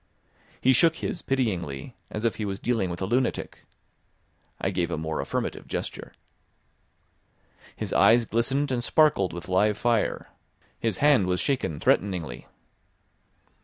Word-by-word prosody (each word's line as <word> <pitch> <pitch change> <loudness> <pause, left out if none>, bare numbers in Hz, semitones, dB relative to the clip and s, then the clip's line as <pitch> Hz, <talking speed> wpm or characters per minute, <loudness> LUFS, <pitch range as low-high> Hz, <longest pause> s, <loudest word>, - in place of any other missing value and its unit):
He 130 - +4
shook 165 +6 +4
his 170 - -4
pityingly, 90 - -2
as 105 +2 -4
if 115 - 0
he 110 - -3
was 100 -1 -3
dealing 115 -6 0
with 85 +2 -4
a - - +1
lunatic. 120 +5 -1 0.9
I 95 - -1
gave 90 -2 -1
a 85 - -2
more 80 0 -2
affirmative - - -3
gesture. - - -5 1.6
His - - -4
eyes 115 +1 +5
glistened 135 +6 0
and 120 -2 -1
sparkled 140 - +3
with 85 -1 -8
live 100 +3 +2
fire, 115 -1 0 0.5
his 110 -5 -1
hand 135 -11 +5
was 90 0 0
shaken 125 - -1
threateningly. 90 -5 0
105 Hz, 135 wpm, -26 LUFS, 90-125 Hz, 1.6 s, eyes